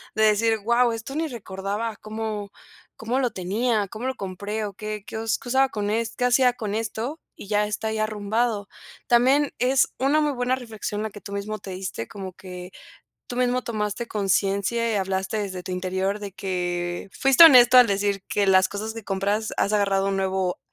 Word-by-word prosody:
de 220 - +2
decir: 220 +1 +3
"Guau, 235 +3 +3
esto 230 +5 -6
ni 320 0 0
recordaba 210 -1 -4
cómo 215 -2 -5 0.5
cómo 235 +4 -1
lo 250 -3 +1
tenía, 205 +3 0
cómo 225 +4 -7
lo 260 - -1
compré 200 +2 -4
o 200 - -6
qué 215 0 -6
qué - - -6
us 225 0 0
qué 245 - -9
usaba 265 +1 +3
con 205 -4 -3
es 225 +1 -1
qué 250 - 0
hacía 250 0 +4
con 215 -4 -4
esto, 225 +7 -3 0.2
y - - -11
ya 210 0 +2
está 210 +1 -3
ahí 220 - -2
arrumbado". 215 0 -1 0.4
También 265 +4 +4
es 255 +1 +3
una 285 +4 +3
muy 300 -1 +1
buena 250 0 0
reflexión 220 -4 -5
la 220 - -2
que 205 - -11
tú 200 - -8
mismo 210 +1 -4
te 195 - -8
diste 185 -11 -5
como 190 -2 -7
que 180 0 -10 0.6
tú 245 - -5
mismo 250 0 +1
tomaste 215 0 -3
conciencia 200 +3 0
y - - 0
hablaste 190 +2 -1
desde 185 -3 -4
tu 185 - -6
interior 190 +2 -1
de 200 -2 -7
que 175 -1 -3
Fuiste 270 +4 +8
honesto 255 -5 +9
al 245 - +8
decir 200 -1 0
que 205 -1 +1
las 190 -1 +5
cosas 215 +2 -4
que 225 -2 -9
compras 200 +3 -1
has 200 - +1
agarrado 195 -2 +2
un 195 - 0
nuevo 190 -1 -1
215 Hz, 195 wpm, -24 LUFS, 195-235 Hz, 0.6 s, honesto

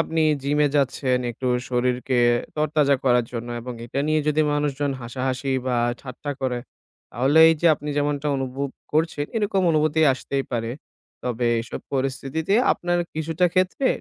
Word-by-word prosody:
আপনি 165 0 0 0.2
জিমে 145 +2 +2
যাচ্ছেন 135 -2 +1
একটু 125 +2 -6 0.2
শরীরকে 125 +1 0 0.4
তরতাজা 150 -2 +2
করার 125 -2 +4
জন্য। 120 0 -5
এবং 125 +2 -6
এটা 135 +4 -2
নিয়ে 155 0 +2
যদি 150 +1 +2
মানুষজন 145 -1 0
হাসাহাসি 130 +2 -2
বা 125 -1 +1 0.2
ঠাট্টা 135 +2 -7
করে, 130 -2 -1 0.5
তাহলে 135 +7 +2
এই 165 - +4
যে 170 - +3
আপনি 150 0 -8
যেমনটা 145 0 -1
অনুভব 135 +1 -3 0.2
করছেন 155 -1 +1
এরকম 205 -3 +1
অনুভূতি 155 0 +2
আসতেই 135 +1 -3
পারে। 115 -1 -1 0.5
তবে 120 -1 -1 0.2
এসব 115 - -7
পরিস্থিতিতে 135 +6 -1 0.2
আপনার 175 0 -1 0.2
কিছুটা 160 +3 +1
ক্ষেত্রে 185 +8 +1
140 Hz, 145 wpm, -23 LUFS, 125-155 Hz, 0.5 s, করার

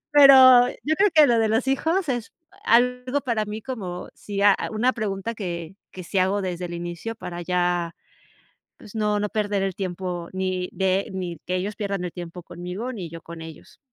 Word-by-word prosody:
Pero, 260 -4 +9 0.2
yo 310 - +2
creo 405 +4 +4
que 305 -2 +8
lo 240 -3 +3
de 220 -1 +2
los 225 +4 +1
hijos, 320 +6 +1
es 240 -3 -3 0.3
algo 250 +3 +2
para 230 -5 0
mí 210 +1 -5
como 190 -9 -6
si, 200 -1 -5
a 205 -1 +7 0.2
una 240 +4 +1
pregunta 215 0 -3
que 175 -4 -5 0.2
que 185 - -8
sí 195 - -2
hago 195 +2 +2
desde 180 -1 -3
el 175 - -7
inicio, 175 +6 -5
para 175 -5 -7
ya, 175 -1 0 0.8
pues, 210 - -14
no 210 -1 +1
no 210 - -1
perder 205 -2 -1
el 195 -1 -1
tiempo, 180 -2 -4
ni 185 -1 -2
de 190 0 0
ni 180 -3 -4
que 180 - -2
ellos 205 +3 -3
pierdan 200 -3 -3
el 175 - -4
tiempo 175 0 -8
conmigo, 180 +10 -6
ni 185 -6 -6
yo 165 0 -8
con 165 -1 -9
ellos. 160 -1 -12
195 Hz, 195 wpm, -24 LUFS, 180-230 Hz, 0.8 s, Pero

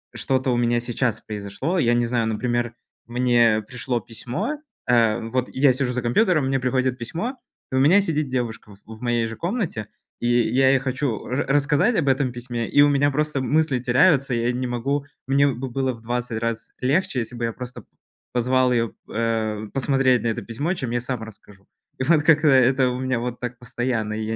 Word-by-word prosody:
что-то 130 0 0
у 120 - +1
меня 120 0 +2
сейчас 120 -1 -1
произошло, 105 - -4
я 120 -7 +3
не 120 0 +2
знаю, 115 -1 0
например, 120 +1 -1 0.3
мне 120 -2 +2
пришло 125 -1 -2
письмо, 125 - -4 0.3
э, 115 -3 +4
вот 125 +1 -1
я 135 -1 +4
сижу 130 -1 -1
за 125 - -1
компьютером, 155 - +2
мне 135 0 +1
приходит 130 0 0
письмо, 170 - -4 0.4
и - - -2
у - - +3
меня 165 +10 +5
сидит 155 -6 -1
девушка 115 -4 -4
в 100 - -18 0.2
в - - -19
моей 120 -2 0
же 115 - -6
комнате, 170 - -3 0.3
и 120 - 0 0.2
я 130 +1 +4
ей 135 0 +4
хочу 130 -3 -2
ра 125 +3 -1
рассказать 145 - +2
об 140 - -1
этом 135 -1 +2
письме 120 -1 -4
и 145 - +5
у 145 - +7
меня 145 0 +2
просто 150 -1 -1
мысли 145 0 +1
теряются. 135 +2 +3
Я 120 +1 +1
не 125 0 -2
могу, 140 +4 -2 0.2
мне 140 +1 +4
бы 130 -1 -3
было 130 +1 -1
в 115 - -13
20 120 0 -3
раз 115 0 -3
легче, 135 +1 +1
если 120 +1 -5
бы 120 - -5
я 115 - -1
просто 125 +1 -8 0.5
позвал 125 +1 +2
её, 115 -2 0 0.2
э, 110 -1 -1
посмотреть 135 -2 +2
на - - 0
это 115 +1 -1
письмо, 130 - -2
чем 130 -9 -4
я 120 0 0
сам 125 -2 -4
расскажу. 100 -2 -14 0.3
И - - 0
вот 150 +1 +3
как-то 160 -1 +4
это 130 0 +4
у 125 - -4
меня 130 -2 -1
вот 120 0 -4
так 125 0 -5
постоянно, 120 -3 -2
и 110 0 -3
я 110 +1 -2
125 Hz, 200 wpm, -23 LUFS, 120-135 Hz, 0.5 s, у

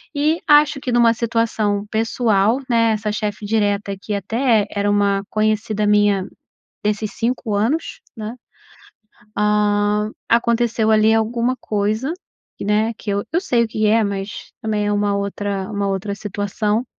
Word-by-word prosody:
e 305 +3 +1
acho 295 -1 +5
que 255 - -3
numa 235 -1 +4
situação 220 -3 0
pessoal, 225 0 +2
né, 230 -1 +3
essa 210 0 -2
chefe 210 0 -3
direta 205 -1 0
aqui 195 +2 -5
até 220 +2 +1
era 205 0 0
uma 200 -1 +2
conhecida 215 0 0
minha, 205 -2 +3 0.6
desses 210 0 -1
5 235 -2 -2
anos, 285 - -1 0.2
né, 220 +2 -5 1.0
ah, 210 0 +2 0.2
aconteceu 235 -1 +2
ali 220 0 +4
alguma 235 +3 +1
coisa, 215 +8 -1 0.5
né, 215 +3 +1
que 210 - -7
eu 200 0 0
eu 340 - +2
sei 245 -11 +2
o - - -2
que 215 -1 0
é 225 +1 +4
mas 200 0 -5
também 215 -2 -1
é 205 - 0
uma 205 0 +1
outra 200 -1 -3
uma 200 -1 -1
outra 195 +1 -2
situação, 210 +3 -2
215 Hz, 145 wpm, -20 LUFS, 205-230 Hz, 1.0 s, acho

